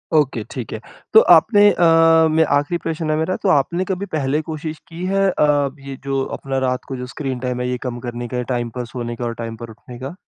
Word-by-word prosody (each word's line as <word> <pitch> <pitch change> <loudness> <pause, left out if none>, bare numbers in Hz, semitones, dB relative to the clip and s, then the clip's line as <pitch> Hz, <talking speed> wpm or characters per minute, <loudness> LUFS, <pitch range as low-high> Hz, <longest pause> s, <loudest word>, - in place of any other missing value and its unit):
Okay, 150 -3 +2
ठीक - - -6
है। - - -4 0.3
तो - - +10 0.2
आपने 205 -2 +5
अ, - - -3 0.5
म, 160 - +1
ये 160 - +7
आख़िरी 145 +4 -1
प्रश्न 160 -1 -3
है - - +2
मेरा। 175 +4 0
तो 195 - +2
आपने 170 +4 +2
कभी 190 +1 -3
पहले 150 0 0
कोशिश 155 0 -6
की 175 +1 -6
है 195 +1 +2
अ, 145 -5 +2
ये 135 0 -8
जो 135 -1 -1
अपना 135 -1 -4
रात 125 0 -2
को 135 - -5
जो 125 - -5
स्क्रीन 130 -1 -4
टाइम 125 0 -3
है, 125 - -1
ये 125 - -1
कम 120 -1 -4
करने 120 0 -5
का 125 +1 -4
या 125 - -1
टाइम 120 -1 -2
पर 125 -1 -3
सोने 120 -1 -5
का, 120 - -5
और 120 - -2
टाइम 115 -1 -6
पर 115 +1 -8
उठने 120 +2 -12
का? 135 +6 -6
135 Hz, 250 wpm, -20 LUFS, 125-160 Hz, 0.5 s, तो